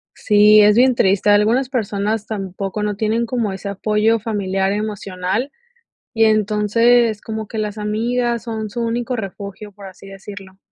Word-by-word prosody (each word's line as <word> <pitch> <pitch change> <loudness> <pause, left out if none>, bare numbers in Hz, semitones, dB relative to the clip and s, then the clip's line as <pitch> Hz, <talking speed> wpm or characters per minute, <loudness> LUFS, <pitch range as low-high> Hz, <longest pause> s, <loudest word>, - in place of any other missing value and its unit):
Sí, 210 0 +5
es 210 0 +5
bien 255 +1 +4
triste. 195 -1 +2
Algunas 225 +6 +3
personas 215 -3 -2
tampoco 195 -1 -5
no 210 -1 -2
tienen 225 +2 0
como 230 -4 -2
ese 195 +1 -6
apoyo 210 +3 +1
familiar 195 -3 -1
emocional, 205 +2 -3 0.7
y 225 - +4
entonces 215 +2 +2
como 220 -1 -6
que 220 - -6
las 210 -1 -3
amigas 235 +3 -1
son 220 -2 -4
su 235 - -5
único 240 +2 -2
refugio, 200 0 -7
por 200 0 -12
así 190 +1 -13
decirlo. 195 -1 -11
210 Hz, 150 wpm, -19 LUFS, 200-225 Hz, 0.7 s, Sí